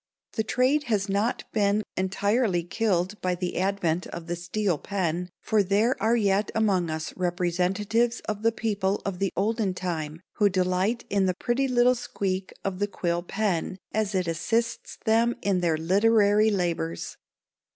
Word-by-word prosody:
The 220 Hz, -, 0 dB
trade 260 Hz, +6 st, +2 dB
has 210 Hz, -4 st, 0 dB
not 205 Hz, +4 st, 0 dB
been 210 Hz, 0 st, +2 dB
entirely 195 Hz, 0 st, +1 dB
killed 190 Hz, +1 st, -1 dB
by 180 Hz, -1 st, 0 dB
the 180 Hz, 0 st, -3 dB
advent 185 Hz, -3 st, 0 dB
of 170 Hz, -1 st, -7 dB
the 175 Hz, +1 st, -3 dB
steel 175 Hz, -1 st, -1 dB
pen, 180 Hz, -3 st, -2 dB
for 215 Hz, -1 st, +3 dB
there 205 Hz, +6 st, +2 dB
are 225 Hz, +2 st, +3 dB
yet 200 Hz, -2 st, +2 dB
among 195 Hz, -6 st, +2 dB
us 160 Hz, 0 st, -4 dB
representatives 185 Hz, +6 st, 0 dB
of 210 Hz, -1 st, -4 dB
the 230 Hz, +1 st, +3 dB
people 205 Hz, -3 st, -1 dB
of 190 Hz, -3 st, -3 dB
the 195 Hz, -1 st, 0 dB
olden 205 Hz, -1 st, 0 dB
time 165 Hz, -3 st, -4 dB, 0.2 s
who 205 Hz, -1 st, +4 dB
delight 185 Hz, +5 st, 0 dB
in 200 Hz, -1 st, +2 dB
the 185 Hz, -, 0 dB
pretty 255 Hz, +7 st, 0 dB
little 250 Hz, 0 st, +4 dB
squeak 190 Hz, -5 st, -3 dB
of 190 Hz, -1 st, -2 dB
the 205 Hz, -, +1 dB
quill 175 Hz, -3 st, -1 dB
pen 190 Hz, -1 st, -1 dB
as 215 Hz, -2 st, -1 dB
it 185 Hz, -2 st, 0 dB
assists 225 Hz, +8 st, -1 dB
them 230 Hz, +2 st, +3 dB
in 195 Hz, -2 st, +2 dB
their 170 Hz, -3 st, +1 dB
literary 205 Hz, +4 st, +4 dB
labors. 170 Hz, -, -2 dB
195 Hz, 160 wpm, -26 LUFS, 180-220 Hz, 0.2 s, who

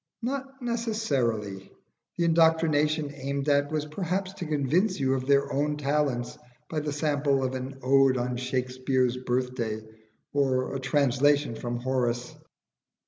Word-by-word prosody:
Not 270 Hz, +1 st, -4 dB
necessarily: 135 Hz, -, -1 dB, 0.5 s
the 170 Hz, -, +1 dB
indoctrination 160 Hz, -2 st, +3 dB
aimed 140 Hz, 0 st, -3 dB
at 145 Hz, 0 st, +2 dB
was 155 Hz, -1 st, -1 dB
perhaps 185 Hz, +4 st, -3 dB
to 180 Hz, -4 st, -6 dB
convince 155 Hz, +7 st, +1 dB
you 135 Hz, -1 st, +2 dB
of 130 Hz, -1 st, -2 dB
their 140 Hz, 0 st, +3 dB
own 150 Hz, +1 st, 0 dB
talents 140 Hz, -4 st, -1 dB, 0.3 s
by 155 Hz, -, 0 dB
the 150 Hz, 0 st, -3 dB
sample 145 Hz, -2 st, +1 dB
of 130 Hz, 0 st, -1 dB
an 130 Hz, +1 st, -5 dB
"Ode 135 Hz, 0 st, +4 dB
on 125 Hz, 0 st, -1 dB
Shakspere's 130 Hz, 0 st, 0 dB
Birthday," 125 Hz, -3 st, -2 dB, 0.5 s
or 135 Hz, -2 st, +1 dB
a -, -, -2 dB
translation 140 Hz, 0 st, +2 dB
from 120 Hz, +1 st, -4 dB
Horace. 125 Hz, -1 st, -1 dB
140 Hz, 135 wpm, -27 LUFS, 130-155 Hz, 0.5 s, Ode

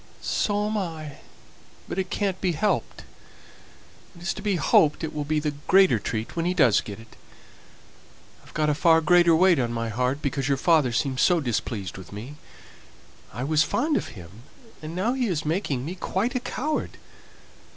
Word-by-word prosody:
"So 205 Hz, 0 st, 0 dB
am 215 Hz, +1 st, -1 dB
I, 160 Hz, -6 st, -6 dB, 0.7 s
but 190 Hz, -, -4 dB
it 185 Hz, -1 st, -2 dB
can't 195 Hz, -3 st, -2 dB
be 180 Hz, -2 st, +1 dB
helped. 200 Hz, +7 st, -1 dB, 1.1 s
It 170 Hz, -, -13 dB
is 190 Hz, -, -1 dB
to -, -, -8 dB
be 205 Hz, -2 st, 0 dB
hoped 155 Hz, -2 st, +3 dB
it 160 Hz, -, -3 dB
will 150 Hz, -1 st, -3 dB
be 155 Hz, +1 st, 0 dB
the 150 Hz, -1 st, -2 dB
greater 190 Hz, -, +5 dB
treat 110 Hz, +1 st, -4 dB
when 165 Hz, -1 st, -1 dB
he 180 Hz, -, 0 dB
does 115 Hz, -, +4 dB
get 105 Hz, 0 st, -8 dB
it. 115 Hz, -1 st, -16 dB, 1.3 s
I've 155 Hz, 0 st, -2 dB
a -, -, +3 dB
far 165 Hz, +2 st, +4 dB
greater 170 Hz, +1 st, +5 dB
weight 175 Hz, -2 st, +4 dB
on 120 Hz, -2 st, 0 dB
my 115 Hz, -1 st, -3 dB
heart, 125 Hz, +6 st, -1 dB
because 135 Hz, -2 st, -1 dB
your 140 Hz, -1 st, +1 dB
father 155 Hz, -4 st, +3 dB
seems 130 Hz, +2 st, -1 dB
so 180 Hz, -2 st, +4 dB
displeased 110 Hz, -, -3 dB
with 95 Hz, -, -12 dB
me. 120 Hz, +9 st, -8 dB, 0.9 s
I 125 Hz, -, -5 dB
was 155 Hz, +2 st, +2 dB
fond 295 Hz, -, +1 dB
of -, -, -1 dB
him, 90 Hz, +5 st, -12 dB, 0.4 s
and 155 Hz, +2 st, -7 dB
now 210 Hz, +7 st, 0 dB
he 260 Hz, -2 st, 0 dB
is 165 Hz, -7 st, -2 dB
making 150 Hz, -6 st, -1 dB
me 170 Hz, -, -4 dB
quite 190 Hz, +5 st, -2 dB
a 255 Hz, -, 0 dB
coward. 300 Hz, +5 st, -3 dB
155 Hz, 180 wpm, -25 LUFS, 130-185 Hz, 1.3 s, greater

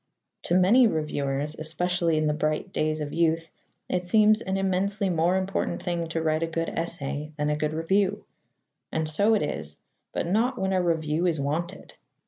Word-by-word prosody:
To 175 Hz, -, +1 dB
many 215 Hz, +7 st, +6 dB
reviewers 150 Hz, -4 st, -2 dB
especially 170 Hz, +1 st, 0 dB
in 155 Hz, -, +1 dB
the 150 Hz, -, +2 dB
bright 155 Hz, +5 st, -2 dB
days 155 Hz, 0 st, 0 dB
of 145 Hz, -1 st, -4 dB
youth 165 Hz, -1 st, +1 dB, 0.4 s
it 180 Hz, -1 st, -1 dB
seems 215 Hz, +3 st, +4 dB
an 190 Hz, 0 st, -2 dB
immensely 195 Hz, +1 st, 0 dB
more 170 Hz, +2 st, +2 dB
important 190 Hz, +1 st, -2 dB
thing 170 Hz, -2 st, -2 dB
to 165 Hz, 0 st, -2 dB
write 155 Hz, 0 st, +1 dB
a 165 Hz, -, 0 dB
good 165 Hz, 0 st, -2 dB
essay 155 Hz, -2 st, -4 dB
than 150 Hz, 0 st, 0 dB
a -, -, +1 dB
good 150 Hz, +1 st, -2 dB
review. 190 Hz, +5 st, +1 dB, 0.7 s
And 160 Hz, 0 st, -1 dB
so 200 Hz, +9 st, +3 dB
it 205 Hz, -, +1 dB
is, 80 Hz, -, -5 dB, 0.3 s
but -, -, -2 dB
not 230 Hz, +8 st, +1 dB
when 190 Hz, -2 st, 0 dB
a 185 Hz, -, +2 dB
review 165 Hz, 0 st, 0 dB
is 160 Hz, -4 st, 0 dB
wanted. 160 Hz, +6 st, -3 dB
165 Hz, 180 wpm, -26 LUFS, 155-190 Hz, 0.7 s, many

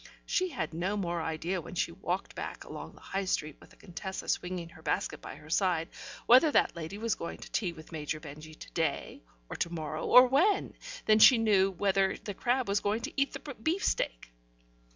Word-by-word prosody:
She 370 Hz, 0 st, +1 dB
had 165 Hz, -, -4 dB
no 185 Hz, +5 st, -1 dB
more 175 Hz, -3 st, -1 dB
idea 165 Hz, +3 st, -2 dB
when 175 Hz, -, -9 dB
she 170 Hz, -, 0 dB
walked 180 Hz, +1 st, -3 dB
back -, -, -6 dB
along -, -, -9 dB
the -, -, -17 dB
High 195 Hz, 0 st, -3 dB
Street 155 Hz, -5 st, -1 dB
with -, -, -17 dB
the -, -, -19 dB
Contessa 190 Hz, +2 st, -7 dB
swinging 180 Hz, -2 st, -2 dB
her 160 Hz, -, -15 dB
basket 155 Hz, -, -2 dB
by -, -, -8 dB
her 155 Hz, +1 st, -13 dB
side, 175 Hz, -3 st, +1 dB, 0.4 s
whether 255 Hz, +6 st, +7 dB
that -, -, +3 dB
lady 170 Hz, +4 st, -6 dB
was 230 Hz, +1 st, 0 dB
going 170 Hz, -, -6 dB
to -, -, -11 dB
tea 185 Hz, -6 st, 0 dB
with 160 Hz, -1 st, -13 dB
Major 155 Hz, -1 st, -3 dB
Benjy 155 Hz, +1 st, -10 dB
to -, -, -12 dB
day 165 Hz, -1 st, -2 dB, 0.3 s
or -, -, -6 dB
to 170 Hz, -, -1 dB
morrow 155 Hz, -2 st, -4 dB
or 250 Hz, +1 st, +9 dB
when, 355 Hz, +11 st, +2 dB, 0.3 s
than 215 Hz, 0 st, +5 dB
she 250 Hz, +3 st, +9 dB
knew 205 Hz, -4 st, +4 dB
whether 195 Hz, 0 st, +1 dB
the 205 Hz, -, -6 dB
crab 245 Hz, +5 st, 0 dB
was 200 Hz, +1 st, +2 dB
going 210 Hz, +3 st, -1 dB
to -, -, -5 dB
eat 275 Hz, 0 st, +1 dB
the 285 Hz, -, -7 dB
beefsteak. 270 Hz, -, -1 dB
185 Hz, 205 wpm, -30 LUFS, 160-215 Hz, 0.4 s, or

